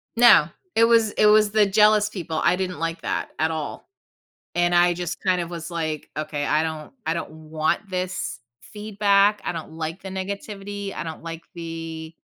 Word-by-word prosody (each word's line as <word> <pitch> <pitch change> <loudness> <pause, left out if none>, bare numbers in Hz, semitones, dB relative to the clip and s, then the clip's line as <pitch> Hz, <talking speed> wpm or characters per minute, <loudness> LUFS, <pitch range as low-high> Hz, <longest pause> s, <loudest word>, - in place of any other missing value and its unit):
No, 240 0 +7 0.3
it 225 - +5
was 230 -2 +4
it 215 - +2
was 210 0 +5
the 215 0 +4
jealous 210 +1 +4
people 170 -6 -4
I 180 - +4
didn't 180 -1 -3
like 165 0 -3
that - - -2
at 160 +1 +2
all. 155 -2 -5 0.7
And 175 0 +2
I 175 0 +5
just, 175 +1 -4
kind 185 -2 +2
of 170 - -5
was 165 -1 -6
like, 155 -3 -3
"Okay, 150 -1 -2
I 155 +2 +2
don't 160 - -5
I 160 - +1
don't 170 - -4 0.2
want 160 +6 0
this 185 0 -3 0.2
feedback, 205 -1 +2
I - - -1
don't 160 -2 -7
like 160 +3 -5
the 190 - -6
negativity, 200 +1 -5
I 150 - -3
don't 160 -1 -7
like 165 0 -7
the" 165 -1 -6
175 Hz, 185 wpm, -24 LUFS, 160-205 Hz, 0.7 s, No